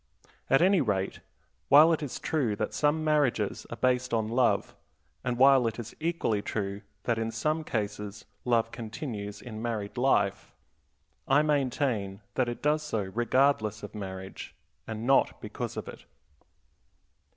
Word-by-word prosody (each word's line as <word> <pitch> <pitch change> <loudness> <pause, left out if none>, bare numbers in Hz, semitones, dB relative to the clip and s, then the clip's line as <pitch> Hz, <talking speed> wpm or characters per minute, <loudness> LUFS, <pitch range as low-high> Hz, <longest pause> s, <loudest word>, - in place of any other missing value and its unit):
At 135 +5 +5
any 190 0 +5
rate, 100 -6 -1 0.5
while 155 +4 +8
it 160 - -1
is 145 -4 -4
true 130 -10 0
that 105 - -3
some 150 +1 +1
marriages 145 -9 +1
are - - -5
based 125 0 +1
on 110 -1 0
love, 120 +1 +1 0.5
and 125 -1 -1
while 135 -1 +6
it 115 - -3
is 120 -1 -7
equally 155 -10 0
true 100 -1 -3 0.2
that 115 -2 0
in 115 0 -1
some 155 +8 -1
cases 105 -4 -4 0.2
love 115 -2 +2
continues 110 -3 -6
in 110 -3 -7
married 115 -1 -3
life, 100 -6 +1 0.7
I 140 +3 +5
maintain 130 -9 0
that 125 -2 +1
it 120 - -6
does 150 +1 +2
so 110 -10 -3
regardless 120 -3 +2
of - - -7
marriage, 95 -2 -7 0.3
and 110 0 -5
not 135 +2 +3
because - - -5
of - - -5
it. - - -10
120 Hz, 150 wpm, -29 LUFS, 105-140 Hz, 0.7 s, while